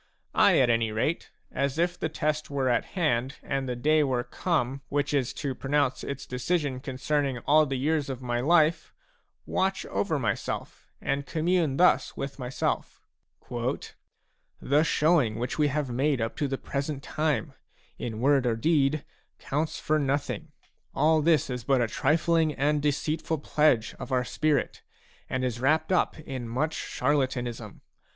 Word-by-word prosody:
I, - - +5
at 125 -3 +4
any 115 -1 +1
rate, 115 +10 -1 0.2
as 140 +2 -1
if 175 +1 +1
the 160 - -3
test 155 0 -2
were 135 -2 0
at 120 - +1
hand 135 -6 +1
and 135 -1 -2
the 125 - -1
day 155 +5 +3
were 130 -3 0
come 140 -6 -1
which 145 +1 0
is 135 -4 +1
to 140 -3 -3
pronounce 135 0 0
its 140 0 -5
decision 135 +1 -1
concerning 135 0 -1
all 155 +2 +5
the 135 - -2
years 150 +1 0
of 130 -2 -4
my 120 -2 -2
life, 160 +3 +3 0.5
watch 190 0 0
over 165 -6 -1
myself 115 -7 -3
and 140 +1 -2
commune 165 -3 +1
thus 180 +1 +3
with 140 +1 -5
myself: 125 +1 -3 1.6
"The 145 +3 +2
showing 150 -7 +2
which 125 +8 -3
we 150 - +4
have 145 -2 -2
made 135 +2 +1
up 115 0 -2
to 145 - 0
the 135 0 -2
present 140 +1 -4
time, 150 -4 -1 0.5
in 110 -2 -4
word 135 0 +3
or 115 - +2
deed, 150 +2 +1 0.3
counts 150 +3 -2
for 155 0 +1
nothing. 145 +2 -2 0.4
All 155 +2 +4
this 155 -2 +3
is 125 -2 -4
but 135 +2 +2
a 120 - +2
trifling 155 +5 +2
and 145 +2 +1
deceitful 155 +2 -1
pledge 145 -5 +2
of - - -7
our 125 -1 +1
spirit, 150 +1 0 0.5
and 130 0 -1
is 120 -2 -2
wrapped 150 +8 +2 0.3
in 130 -5 -5
much 150 +7 -1
charlatanism. 125 -5 -2
140 Hz, 155 wpm, -27 LUFS, 130-155 Hz, 1.6 s, I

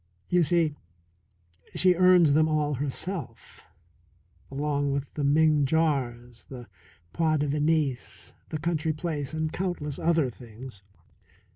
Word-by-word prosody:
You 180 0 +3
see, 165 -2 +2 1.0
she 185 -1 +5
earns 180 -4 +5
them 155 +1 +4
all 150 -1 0
herself, 145 +4 -5 0.9
along 145 0 -1
with 140 0 -4
the 150 - -3
Ming 150 +1 +3
jars, 125 -6 -1
the 125 -3 -9 0.5
point 155 -3 +1
de 150 - 0
Venise, 150 -2 -1 0.2
the 155 - -3
country 160 0 -1
place, 150 -3 -4
and 155 0 -3
countless 175 -6 -3
other 160 -6 +1
things. 120 -2 -12
150 Hz, 120 wpm, -27 LUFS, 140-160 Hz, 1.0 s, she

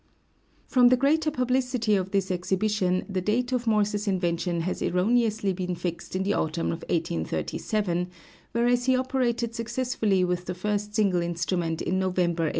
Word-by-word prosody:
From 250 -2 +5
the 255 +1 +5
greater 305 +4 +2
publicity 250 -4 0
of 190 -1 -1
this 195 -1 0
exhibition 185 +1 0
the 190 -2 -2
date 240 +6 0
of 250 -2 -1
Morse's 210 -1 +1
invention 175 -2 0
has 180 +3 -3
erroneously 210 +1 +1
been 180 -1 -3
fixed 175 +1 -5
in 190 - 0
the 200 +1 +1
autumn 165 -1 -1
of 165 - -4
1837, 170 - -1 0.4
whereas 240 +1 +2
he 260 0 +4
operated 245 -3 0
successfully 230 -4 0
with 180 0 -1
the 180 - -4
first 210 +2 -2
single 195 -5 +2
instrument 170 -1 -1
in 185 +1 0
November, 180 -3 +1
1835. - - +1
195 Hz, 155 wpm, -26 LUFS, 180-235 Hz, 0.4 s, From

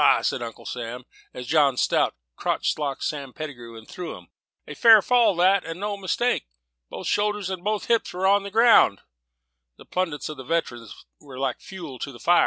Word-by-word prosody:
said - - -1
Uncle 115 -2 -8
Sam, 120 +1 -6 0.3
as 125 - -8
John 145 -3 +3
Strout - - +1 0.2
crotch - - -1
locked 140 -2 -3
Sam 140 -4 -4
Pettigrew, 120 -7 -8
and 110 - -13
threw 180 -1 -7
him; - - -17 0.4
"a - - -7
fair 225 -2 +7
fall 230 -2 +3
that, 185 +3 +3
and 165 +2 -7
no 205 0 -2
mistake. 200 - -1 0.4
Both - - -7
shoulders 205 -2 0
and 185 -2 -5
both 210 0 -1
hips 230 -1 +1
on 190 +2 +3
the 200 - -7
ground." 220 - +5 0.8
The - - -15
plaudits 170 -6 -2
of 155 - -7
the 130 - -8
veterans 120 -7 -4
were 140 -3 -12
like 135 -2 -2
fuel 165 -9 -9
to 140 - -5
the 125 - -12
fire. 175 +7 +4
165 Hz, 190 wpm, -24 LUFS, 130-200 Hz, 0.8 s, fair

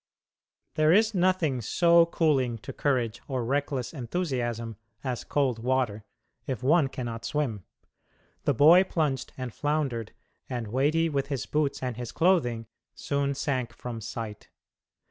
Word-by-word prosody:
There 155 0 +3
is 220 +4 +4
nothing 180 -8 +1
so 170 - +4
cooling 135 -8 +1
to - - -6
courage 120 -5 0
or 130 -4 -2
reckless 140 0 -1
enthusiasm 120 - -3 0.3
as 125 -3 -3
cold 130 -5 0
water 120 -4 0 0.4
if 130 -4 -3
one 150 +2 +4
cannot 120 -3 -5
swim. 120 -11 -2 0.8
The 145 - +3
boy 165 +8 +7
plunged 150 -8 -1
and 130 -3 -5
floundered, 140 -7 -1 0.4
and 120 -4 -4
weighty 150 +7 +2
with 140 -3 -1
his 140 -4 -3
boots 150 -3 -1
and 125 -3 -3
his 120 -2 -5
clothing, 135 -11 +2 0.3
soon 140 0 -1
sank 130 -4 -2
from 115 -1 -6
sight. 110 -1 -6
130 Hz, 135 wpm, -27 LUFS, 120-150 Hz, 0.8 s, boy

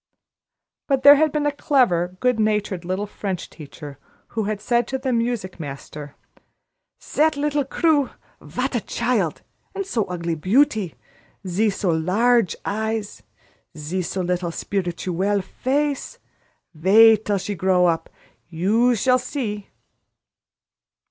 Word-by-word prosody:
But 270 -2 +1
there 285 - +11
had 310 +1 +3
been 300 0 -1
a 290 - +2
clever, 185 - +1
good 250 -3 +2
natured 210 -4 0
little 185 +3 -2
French 195 -3 -5
teacher 145 -2 -11 0.3
who 220 -2 -2
had 210 0 -2
said 235 +2 +1
to 265 - -2
the 260 -1 -2
music 230 -6 -2
master: 145 0 -8 0.8
"Zat 310 0 +1
leetle 290 -1 0
Crewe. 290 -1 +2 0.3
Vat - - -3
a - - 0
child! - - -1 0.3
A 395 - -2
so 240 - -1
ogly 170 -2 -3
beauty! 205 - +1 0.5
Ze 205 +5 +1
so 195 -2 -1
large 200 +7 +2
eyes! 220 0 -3 0.6
ze 160 +5 -3
so 185 +2 -3
little 180 -1 -1
spirituelle 190 +2 -2
face. 280 +5 -2 0.6
Waid 215 +7 +6
till 205 -2 0
she 205 +2 -4
grow 185 -1 +2
up. 165 -2 0 0.4
You 215 +9 +2
shall 255 +4 +3
see!" 215 -7 -4
210 Hz, 130 wpm, -22 LUFS, 180-250 Hz, 0.8 s, there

